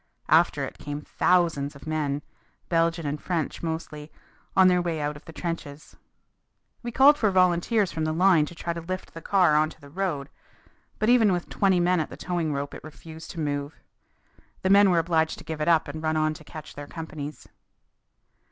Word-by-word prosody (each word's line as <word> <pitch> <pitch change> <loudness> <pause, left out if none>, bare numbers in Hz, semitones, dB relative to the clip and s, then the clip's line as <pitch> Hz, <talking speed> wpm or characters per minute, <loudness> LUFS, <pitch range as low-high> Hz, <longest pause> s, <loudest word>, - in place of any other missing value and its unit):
After - - +4
it - - -10
came 145 0 -5
thousands 165 -5 +1
of 140 - -13
men, 150 -2 -2 0.5
Belgian 165 -1 +1
and 145 +1 -3
French 170 -5 -2
mostly, 160 -2 -5 0.5
on 190 -1 +7
their 180 -1 +4
way 170 -2 -2
out 150 0 -2
of 145 - -13
the - - -10
trenches. 160 -4 -6 0.9
We 240 - -5
called 280 +5 +6
for 215 - +3
volunteers 185 +2 +2
from 160 - -3
the 155 - 0
line 170 -2 +4
to 170 - -10
try 170 0 -3
to 170 - -6
lift 185 +3 -6
the 165 - -8
car 180 -4 +3
onto 155 +1 +1
the 140 -2 -15
road. 155 -6 -2 0.7
But 215 - +1
even 230 -4 +5
with 175 -1 -2
twenty 190 -3 +2
men 175 0 +2
at 155 - -2
the - - -10
towing 175 -3 -2
rope 140 0 -3
it - - -10
refused 160 +1 -11
to 170 - -8
move. 145 -1 -3 0.8
The 190 - +2
men 200 0 +7
were 175 - +3
obliged 160 -1 +1
to - - -11
give 160 -1 -5
it 150 - -1
up 165 -2 +4
and 150 +2 -6
run 155 0 0
on 155 0 +1
to 155 - -12
catch 155 0 -10
their 145 0 -8
companies. 155 -2 -7
160 Hz, 200 wpm, -26 LUFS, 150-180 Hz, 0.9 s, on